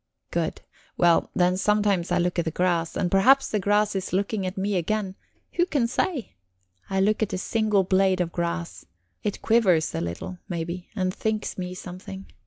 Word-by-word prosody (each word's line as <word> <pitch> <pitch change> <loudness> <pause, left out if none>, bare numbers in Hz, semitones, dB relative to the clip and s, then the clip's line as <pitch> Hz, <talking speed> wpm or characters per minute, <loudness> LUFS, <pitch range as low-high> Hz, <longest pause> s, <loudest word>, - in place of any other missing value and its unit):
"Good. - - -2 0.4
Well, 170 -1 +4
then 180 0 +3
sometimes 200 -3 +1
I 175 - +3
look 175 0 0
at 170 - 0
the - - 0
grass, 170 0 0
and 175 - 0
perhaps 265 +8 +5
the 210 - +1
grass 205 +1 +2
is 190 -1 -3
looking 195 0 0
at 185 - -5
me 200 +1 0
again 190 +2 -1 0.4
who 350 +1 +2
can 280 -9 +1
say? 260 - -2 0.6
I 190 - 0
look 210 +3 +2
at 215 - 0
a - - 0
single 210 0 +1
blade 190 0 +2
of 175 -2 0
grass; 170 0 -3 0.4
it 205 - -3
quivers 195 -9 +3
a - - -2
little, 85 - -5
maybe, 170 +1 -4
and 185 -2 0
thinks 215 0 -2
me 180 -1 -5
something. 185 +1 -8
190 Hz, 185 wpm, -25 LUFS, 180-210 Hz, 0.6 s, perhaps